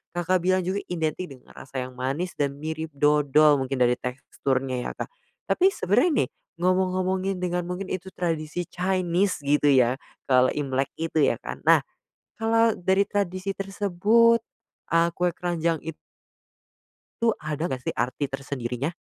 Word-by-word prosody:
Kakak 180 +1 +1
bilang 185 +1 +2
juga 190 +3 -1
identik 165 +1 -2
dengan 130 -2 -14
rasa 130 -1 -6
yang 130 0 -9
manis 135 +8 -3
dan 140 -1 -2
mirip 160 +1 -4
dodol 150 0 +4
mungkin 130 +1 -2
dari 125 0 +2
teksturnya 130 0 -2
ya, - - -4
Kak, - - -6 0.4
tapi 370 - +4
sebenarnya 250 - +2
nih, - - -5 0.3
ngomong-ngomongin 185 +1 +1
dengan 175 0 -1
mungkin 180 +2 -4
itu 185 0 -4
tradisi 165 -1 -2
Chinese 185 -1 0
gitu 145 +1 +2
ya, 130 -1 +4 0.2
kalau 130 -1 +4
Imlek 135 -2 0
itu 165 0 -1
ya 140 - +4
kan, - - -7
nah, - - +6 0.6
kalau 225 0 +3
dari 190 +2 +3
tradisi 195 -1 -1
tersebut 205 +4 +3 0.5
a 165 0 +4
kue 180 0 +1
keranjang 170 -3 -1
it 160 -1 -6 1.3
tu 230 -1 +4
ada 155 +1 -3
enggak 130 -6 -3
sih - - -1
arti 130 +4 -1
tersendirinya? 135 +1 -3
165 Hz, 150 wpm, -25 LUFS, 140-185 Hz, 1.3 s, nah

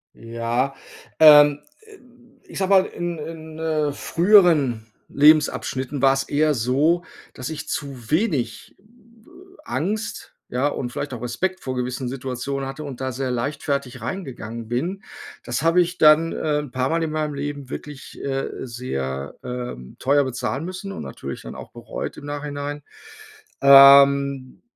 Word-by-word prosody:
Ja, 115 +4 -2 0.4
ähm, 145 -2 +8 0.2
äh, 435 -2 -16 0.5
ich - - -11
sage 190 0 0
mal, 190 -1 +5
in 175 -1 -5
in, 160 0 -8
äh, 155 -2 0
früheren 165 - +3 0.2
Lebensabschnitten 145 -2 +2
war's 135 0 +3
eher 150 +2 +1
so, 145 +9 +1 0.3
dass 125 +2 -6
ich 160 - -6
zu 130 -5 -5
wenig, 150 - -1
äh, - - -28 0.8
Angst, 215 - -3
ja, 130 +4 0
und 125 -4 -4
vielleicht 140 0 -5
auch 120 - -7
Respekt 185 +11 -2
vor 130 -1 -5
gewissen 125 0 -3
Situationen 135 +1 -4
hatte 150 +3 -7
und 135 -3 -8
da 130 0 -2
sehr 130 0 -3
leichtfertig 140 +1 -3
reingegangen 120 - -6
bin. 180 - -3 0.4
Das 120 +5 -3
habe 165 +2 +4
ich 180 +1 -2
dann, 155 +2 +5
ähm, 150 -1 -1
'n - - -16
paarmal 135 +6 0
in 155 - -2
meinem 155 -1 -2
Leben 140 -1 -5
wirklich, 145 -2 -9
äh, 135 -1 -2 0.2
sehr, 70 - -5
ähm, 125 - -7
teuer 140 +2 +3
bezahlen 130 +3 -3
müssen 185 +2 -6
und - - -7
natürlich - - -7
dann - - -9
auch - - -10
bereut - - -6
im 145 - -10
Nachhinein. 145 0 -5 0.8
Ähm, 140 -1 +6
140 Hz, 145 wpm, -22 LUFS, 125-155 Hz, 0.8 s, ähm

